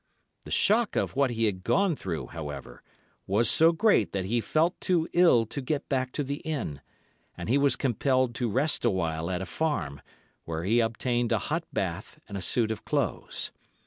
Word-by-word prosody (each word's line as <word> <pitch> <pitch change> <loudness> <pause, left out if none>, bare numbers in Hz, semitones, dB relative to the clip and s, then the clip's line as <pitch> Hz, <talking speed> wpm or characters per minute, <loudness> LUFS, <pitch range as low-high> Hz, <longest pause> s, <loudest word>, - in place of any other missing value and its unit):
The - - -9
shock 220 +1 +2
of - - -1
what 140 -1 +3
he 115 -1 0
had 95 -4 -1
gone 195 - +2
through, 90 - -4
however, 75 -4 -7 0.5
was 105 +5 +2
so 165 +1 +5
great 170 - +2
that 95 -2 -1
he 115 +4 0
felt 160 - +1
too 170 -3 +1
ill 170 -10 +5
to 140 +6 -5
get 140 +2 -2
back 130 -2 0
to 145 - -1
the 140 +1 -3
inn, 140 - -4 0.6
and - - -6
he 130 +5 +3
was 140 -1 +3
compelled 130 0 +1
to 120 0 -1
rest 140 +8 +2
awhile 85 -7 0
at 90 0 -2
a - - -5
farm, 145 - -2 0.4
where 80 0 -4
he 110 +6 +3
obtained 120 +1 0
a - - +4
hot - - -2
bath - - -4
and 100 - -8
a 95 - -3
suit 110 +3 +1
of 110 - -5
clothes. - - -2
120 Hz, 190 wpm, -28 LUFS, 95-145 Hz, 0.6 s, so